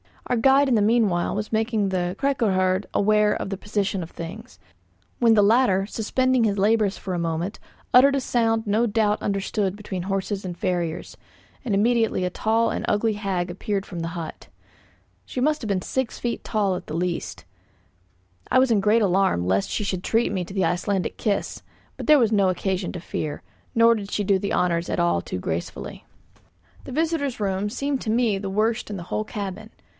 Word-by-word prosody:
Our 245 - 0
guide 270 +4 +4
in 245 - +3
the 215 - +3
meanwhile 205 -5 +2
was 210 +1 -3
making 220 -2 +1
the 180 -1 -1
'kyrkoherde' 195 -9 +1
aware 210 0 +3
of - - -4
the 195 - -3
position 205 -1 -2
of 165 - -7
things; 210 +9 -8 0.6
when 230 -2 +5
the 210 -2 +5
latter, 205 -3 +3
suspending 250 +3 +1
his 205 -2 0
labours 210 0 +2
for 190 - -5
a 175 - -1
moment, 170 +4 -2 0.3
uttered 275 +3 +7
a 275 - 0
sound 225 -2 +1
no 220 +3 +2
doubt 210 -1 +1
understood 195 0 -1
between 195 -3 -5
horses 195 +1 -2
and 175 -1 -5
farriers, 175 -5 -2 0.5
and 215 -5 0
immediately 225 -2 +2
a 180 - 0
tall 225 +3 +1
and - - -3
ugly 215 +1 +1
hag 190 -4 -2
appeared 195 +2 -3
from 175 - -7
the 165 - -3
hut. 165 -2 -7 0.8
She 250 - -4
must 305 +3 +1
have 225 - -4
been 195 -3 0
six 260 -3 -2
feet 240 -1 -4
at 195 -4 0
the 155 - -5
least. 170 - -3 1.1
I - - +3
was 260 -1 +4
in 215 - +4
great 210 +3 +3
alarm 190 - +2
lest 95 +2 +1
she - - -2
should 185 -3 -2
treat 230 +1 +1
me 185 -3 -2
to 190 - -10
the 190 -3 +1
Icelandic 180 +3 -1
kiss; 205 -2 -2 0.4
but - - -6
there 305 -1 +7
was 230 -3 +3
no 200 -3 +3
occasion 185 0 -2
to 175 - -6
fear, 155 -4 -4 0.3
nor 230 0 +6
did 200 -2 -6
she 205 - -1
do 195 -1 +2
the 200 - -2
honours 170 -1 +1
at - - -1
all 85 0 +2
too 90 - -5
gracefully. 85 -1 -5 0.8
The 260 - -7
visitors' 305 -5 -1
room 195 0 -1
seemed 275 +4 -2
to - - -4
me 225 -2 +2
the 195 -1 -4
worst 215 +4 0
in 205 - -4
the 175 - -6
whole 215 - -1
cabin. 205 +1 -6
205 Hz, 195 wpm, -24 LUFS, 185-225 Hz, 1.1 s, uttered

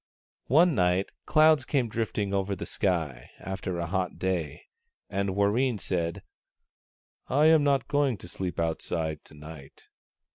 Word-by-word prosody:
One 165 +6 +5
night, 90 -2 +1 0.2
clouds 155 -2 +5
came 130 -2 0
drifting 105 -3 -2
over 100 0 0
the - - -6
sky, 80 - -2
after 95 -2 -4
a 85 - -2
hot 90 +1 -2
day, 85 -5 -2 0.5
and 100 -1 -1
Warreen 110 +5 +2
said, 85 -2 -2 0.5
" - - - 0.2
I 145 +3 +3
am 160 -1 +6
not 140 -3 +2
going 145 -5 +1
to 90 - -11
sleep 90 -1 -5
outside 80 -1 -2
to - - -14
night." 75 -2 -12
95 Hz, 145 wpm, -27 LUFS, 85-130 Hz, 0.5 s, am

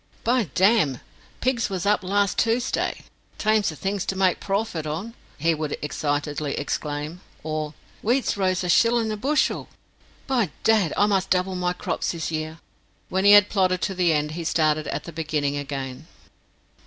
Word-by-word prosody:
"By 240 -1 +2
damn, 190 - +3 0.4
pigs 250 -3 +1
was 190 -1 -3
up 205 +1 +3
last 200 +1 +1
Toosday! 230 +2 0 0.4
Thames 215 -1 +2
the 155 - -6
things 195 +4 -2
to 195 - -1
make 190 -2 +2
prawfit 195 -6 -2
on," 180 +10 -4 0.2
he 165 +3 +2
would 155 -1 -3
excitedly 145 0 -2
exclaim; 150 +3 -3 0.2
or 155 -1 -3 0.3
"Wheat's 245 +4 +1
rose 185 -2 0
a - - -2
shillun 230 +3 +3
a - - -1
bushel! 275 +8 0 0.6
By 240 -9 +1
dad, 215 -8 +3
I 205 - +5
must 195 -2 +1
double 185 +1 +1
my 180 0 0
crops 180 - -2
this 165 -1 -4
year." 155 0 -3 0.5
When 190 +1 0
he 205 - +9
had 205 0 +8
plodded 185 -2 +1
to 195 - 0
the 180 -2 +2
end, 150 -1 0
he 165 +2 -5
started 155 -2 +1
at - - -3
the 170 - -9
beginning 150 -3 -1
again. 135 -2 -5
180 Hz, 165 wpm, -24 LUFS, 155-205 Hz, 0.6 s, he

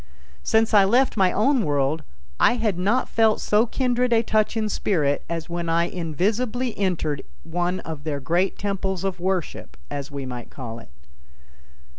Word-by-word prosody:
Since 220 - +2
I 205 -2 +7
left 245 +7 +3
my 190 -4 +3
own 255 +3 +2
world 145 0 0 0.4
I - - +5
had 220 -7 -1
not 205 +8 +1
felt 220 -1 +3
so 215 +3 +2
kindred 250 0 0
a 230 -1 +4
touch 215 +1 +1
in 215 -1 0
spirit 155 -9 0
as 165 -1 -3
when 170 -1 -3
I 165 +1 +3
invisibly 210 - -1
entered 170 -7 -1 0.2
one 175 +2 -2
of 155 -3 -7
their 145 -2 -2
great 175 +8 0
temples 195 -2 -2
of 190 -2 -2
worship, 185 -1 -3
as 140 -1 -4
we 140 -2 -5
might 125 -2 -7
call 115 -4 -7
it. 115 - -15
185 Hz, 165 wpm, -24 LUFS, 160-220 Hz, 0.4 s, I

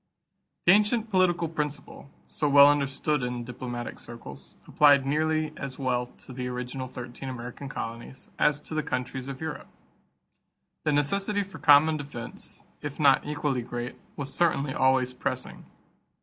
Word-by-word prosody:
This 175 - +8
ancient 215 +2 +2
political 175 -3 +3
principle, 150 -3 -5 0.2
so 150 - -1
well 140 0 +9
understood 145 +1 +1
in 125 -1 -3
diplomatic 120 0 -6
circles, 65 - -10
applied 145 -2 +5
nearly 155 +2 0
as 135 -2 -6
well 125 -2 0 0.2
to 130 - -10
the 125 0 -4
original 125 +1 -4
thirteen 125 +1 -7
American 125 +2 -7
colonies 115 +2 -7
as 150 -1 +3
to 155 - -9
the 155 - +1
countries 130 -1 -4
of 135 -1 -6
Europe. 160 -2 -5 1.2
The 155 - +3
necessity 200 +8 +1
for 195 0 -11
common 150 +1 +6
defense, 140 -6 -8 0.2
if 145 0 -6
not 140 -2 +4
equally 145 -3 -1
great, 120 +1 -5 0.2
was 140 -1 -5
certainly 145 -5 +1
always 130 -1 +2
pressing. - - -4
140 Hz, 145 wpm, -27 LUFS, 125-150 Hz, 1.2 s, well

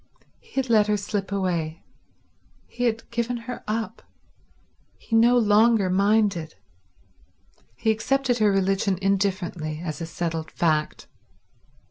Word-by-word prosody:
He 465 - -24
had 265 -1 -1
let 215 -3 +4
her 210 0 +2
slip 200 -1 -3
away; 170 -5 -2 0.8
he 245 - -4
had 230 -1 -1
given 235 +1 -1
her 250 0 -6
up; 225 +1 -3 1.0
he 225 - -3
no 235 +2 +5
longer 215 -3 +4
minded; 195 -4 +1 1.2
he 220 - +1
accepted 245 +2 0
her 210 -2 +4
religion 195 0 +1
indifferently, 190 -5 -1
as 155 0 -5
a 165 - -4
settled 165 -1 -4
fact. 155 -3 -1
205 Hz, 120 wpm, -24 LUFS, 180-225 Hz, 1.2 s, no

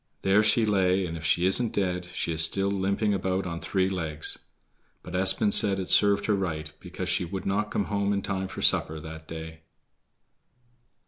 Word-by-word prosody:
There 95 +2 +4
she 110 +2 +3
lay, 95 -2 +1
and 85 -1 -6
if 80 - -8
she 85 +3 +2
isn't 110 +5 +1
dead 90 -2 -1
she 90 -1 -4
is 80 0 +2
still 100 +3 +1
limping 100 +2 0
about 95 0 -2
on 85 -2 -5
three 95 +1 -1
legs. 80 -5 0 0.6
But 90 - -10
Espen 95 +3 +3
said 100 -2 +5
it 95 - -2
served 100 -1 +4
her 105 - +1
right, 80 -6 -3
because 90 0 -7
she 90 0 0
would 95 +2 -6
not 105 +2 -1
come 100 - -2
home 100 -1 -1
in 100 -1 -1
time 95 -1 -3
for - - -7
supper 80 0 +3
that 80 0 -10
day. 80 0 -8
95 Hz, 190 wpm, -26 LUFS, 85-100 Hz, 0.6 s, said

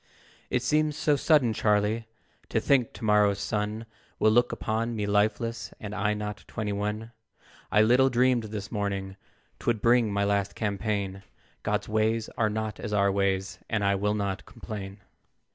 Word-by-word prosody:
"It - - 0
seems 150 -1 +1
so 150 -1 +2
sudden, 140 -5 +3
Charlie, 105 +2 +1 0.4
To - - +1
think 130 -5 +2
to - - -7
morrow's 105 -1 +4
sun 105 +1 -2 0.3
Will 110 - +4
look 120 +2 +3
upon 115 +2 -2
me 105 -2 -1
lifeless, 110 +3 0
And 105 -1 -6
I 105 0 0
not 105 0 -5
twenty 105 -2 -3
one! 105 +3 -3 0.6
I 105 - +5
little 125 +4 +5
dreamed 125 -1 +2
this 105 -2 -6
morning, 100 -2 -2 0.4
Twould 115 -2 0
bring 115 -1 +3
my 100 0 +1
last 100 -1 0
campaign; 100 -2 -2 0.4
God's 105 0 -1
ways 110 +1 +1
are 110 -2 +2
not 110 -1 -3
as 105 - -4
our 100 -1 +3
ways, 95 -1 0
And 110 -3 0
I 100 0 +3
will 105 +2 0
not 100 -1 -2
complain. 100 -2 -8
105 Hz, 160 wpm, -27 LUFS, 100-115 Hz, 0.6 s, I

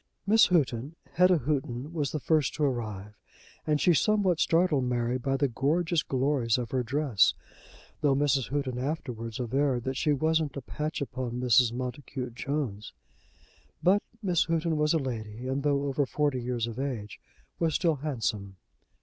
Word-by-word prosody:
Miss 220 +3 +6
Houghton 145 -4 0 0.2
Hetta 180 0 +4
Houghton 135 0 -3
was 150 -5 -1
the 155 - -2
first 155 -2 +1
to 150 - -1
arrive, 110 -7 -2 0.5
and 150 -1 +2
she 175 - +4
somewhat 185 +2 +2
startled 165 -6 +2
Mary 125 0 0
by 135 +1 -1
the 140 - +2
gorgeous 155 +7 +1
glories 130 -4 +1
of 120 -2 -4
her 130 - +1
dress, 130 -3 +2 0.7
though 145 -3 +3
Mrs. 140 -2 +1
Houghton 135 -3 -2
afterwards 125 -5 -4
averred 125 0 0
that 130 +1 -3
she 150 - +1
wasn't 155 0 +1
"a - - -4
patch 150 +4 -4
upon 130 -3 -4
Mrs. 125 -1 +4
Montacute 125 0 -5
Jones." 120 -6 -4 0.9
But 195 +3 +4 0.2
Miss 180 -4 +2
Houghton 165 -1 0
was 150 +1 +2
a - - +4
lady, 115 -4 -5
and 135 +2 -1
though 140 -1 +1
over 140 0 0
forty 145 -3 0
years 120 -1 -2
of 120 +1 -6
age, 120 -7 -4 0.4
was 165 -3 +1
still 165 -3 +2
handsome. 110 -9 -3
135 Hz, 160 wpm, -28 LUFS, 125-155 Hz, 0.9 s, Miss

